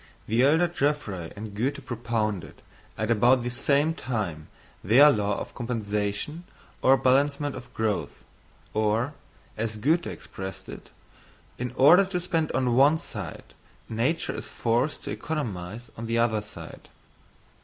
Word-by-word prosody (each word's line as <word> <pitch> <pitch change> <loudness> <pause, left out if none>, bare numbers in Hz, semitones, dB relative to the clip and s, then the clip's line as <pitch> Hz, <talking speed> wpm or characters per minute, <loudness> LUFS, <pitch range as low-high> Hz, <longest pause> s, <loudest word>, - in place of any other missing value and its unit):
_ - - -25 0.2
The 115 +3 +2
elder 160 +6 +4
Geoffroy 140 - -2
and 105 0 -7
Goethe 135 +6 -2
propounded, 110 - -3 0.3
at 110 +1 -1
about 120 +3 +4
the 125 - -2
same 140 +5 +2
time, 105 - -4 0.4
their 135 +9 +7
law 105 -3 0
of - - -7
compensation 110 +5 -3 0.4
or 135 +1 +6
balancement 140 +3 +2
of 125 - -10
growth; 110 -2 -2 0.5
or, 110 +6 +1 0.4
as 110 0 -2
Goethe 160 +10 +2
expressed 95 -2 -7
it, - - -10 0.7
"in 125 -1 -3
order 165 +10 +7
to 185 -1 -2
spend 165 -3 -1
on 130 -2 +1
one 140 +5 +5
side, - - -8 0.4
nature 120 +9 0
is - - -6
forced 120 +6 0
to - - -5
economise 115 - -4
on 115 +1 -6
the 115 +1 0
other 115 -2 +2
side." 105 - -11
120 Hz, 140 wpm, -26 LUFS, 105-145 Hz, 0.7 s, their